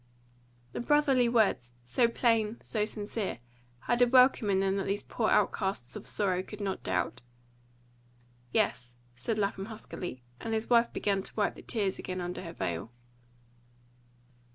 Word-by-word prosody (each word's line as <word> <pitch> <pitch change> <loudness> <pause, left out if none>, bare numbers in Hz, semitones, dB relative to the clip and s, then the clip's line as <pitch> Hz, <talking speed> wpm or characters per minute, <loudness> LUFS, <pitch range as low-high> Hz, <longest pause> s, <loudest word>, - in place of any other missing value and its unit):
The - - -3
brotherly 270 -2 +3
words, 205 - +2
so 230 - +3
plain, 230 -2 +1
so 210 -2 0
sincere, 210 - -4 0.4
had 240 - 0
a 245 - +7
welcome 250 -3 +5
in 190 -1 +3
them 195 0 +1
that 195 - -2
these 200 +1 -1
poor 220 - -1
outcasts 190 -11 +1
of - - -7
sorrow 185 -3 +1
could 210 +2 -10
not 195 -2 -2
doubt. 90 +6 -1 1.3
"Yes," 120 0 0 0.2
said 215 - -2
Lapham 200 -1 -1
huskily, 185 - -7 0.2
and 225 -1 -2
his 220 +2 -3
wife 235 0 +5
began 200 -2 0
to - - -5
wipe 210 -2 +1
the - - -12
tears 200 -5 -1
again 185 0 -4
under 175 0 -4
her 170 -2 -7
veil. 85 - -3
205 Hz, 155 wpm, -30 LUFS, 185-230 Hz, 1.3 s, a